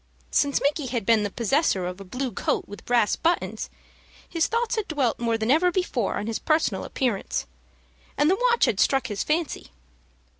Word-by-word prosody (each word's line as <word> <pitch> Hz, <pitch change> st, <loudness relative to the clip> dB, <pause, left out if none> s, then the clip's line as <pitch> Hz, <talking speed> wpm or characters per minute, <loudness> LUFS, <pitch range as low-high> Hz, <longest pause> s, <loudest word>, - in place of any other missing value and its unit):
Since 285 Hz, -1 st, +2 dB
Micky 285 Hz, 0 st, +1 dB
had 235 Hz, -4 st, -2 dB
been 225 Hz, 0 st, +4 dB
the 205 Hz, -, -1 dB
possessor 230 Hz, -, +1 dB
of 180 Hz, +2 st, -5 dB
a -, -, -6 dB
blue 250 Hz, +7 st, -4 dB
coat 200 Hz, -, -1 dB
with 205 Hz, -, -11 dB
brass 235 Hz, -3 st, +3 dB
buttons, 340 Hz, +2 st, -1 dB, 0.6 s
his 330 Hz, -1 st, 0 dB
thoughts 465 Hz, +1 st, 0 dB
had 435 Hz, -3 st, -2 dB
dwelt 275 Hz, -7 st, 0 dB
more 230 Hz, -1 st, +1 dB
than 220 Hz, +2 st, 0 dB
ever 350 Hz, +5 st, +4 dB
before 330 Hz, -, -1 dB
on 205 Hz, -, -3 dB
his 225 Hz, 0 st, -2 dB
personal 310 Hz, +1 st, +1 dB
appearance, 240 Hz, -8 st, -2 dB, 0.7 s
and 290 Hz, -, +3 dB
the 390 Hz, +9 st, +3 dB
watch 475 Hz, 0 st, +4 dB
had 205 Hz, -, 0 dB
struck 270 Hz, -1 st, +3 dB
his 205 Hz, -5 st, -3 dB
fancy. 320 Hz, +1 st, -2 dB
260 Hz, 185 wpm, -25 LUFS, 220-325 Hz, 0.7 s, been